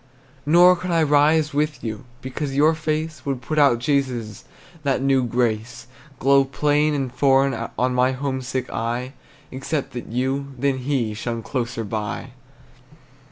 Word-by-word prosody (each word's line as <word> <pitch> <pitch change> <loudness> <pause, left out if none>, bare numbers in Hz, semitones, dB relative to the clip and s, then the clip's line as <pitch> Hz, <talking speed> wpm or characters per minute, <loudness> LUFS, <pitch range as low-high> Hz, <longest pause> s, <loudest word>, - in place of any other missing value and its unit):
Nor 175 +3 +7
could 180 +1 -5
I 165 -2 +3
rise 150 +1 +3
with 150 +1 -1
you, 110 0 -5 0.2
Because 135 +1 -4
your 150 +3 +4
face 155 0 -3
Would 135 -3 -2
put 150 +5 -2
out 140 -5 +5
Jesus', 125 -5 -2 0.4
That 140 -2 0
new 135 -1 +2
grace 120 0 -1 0.3
Glow 135 +2 +4
plain 150 +2 +1
and 135 -3 -3
foreign 135 -2 +2
On 125 0 +1
my 125 +1 +3
homesick 130 -1 -3
eye, 120 +3 -3 0.4
Except 135 +2 -3
that 120 - -6
you, 135 +3 -2
than 135 +1 0
he 125 -4 -1
Shone 115 +1 -4
closer 120 -3 -3
by. 105 0 -4
135 Hz, 145 wpm, -22 LUFS, 120-145 Hz, 0.4 s, Nor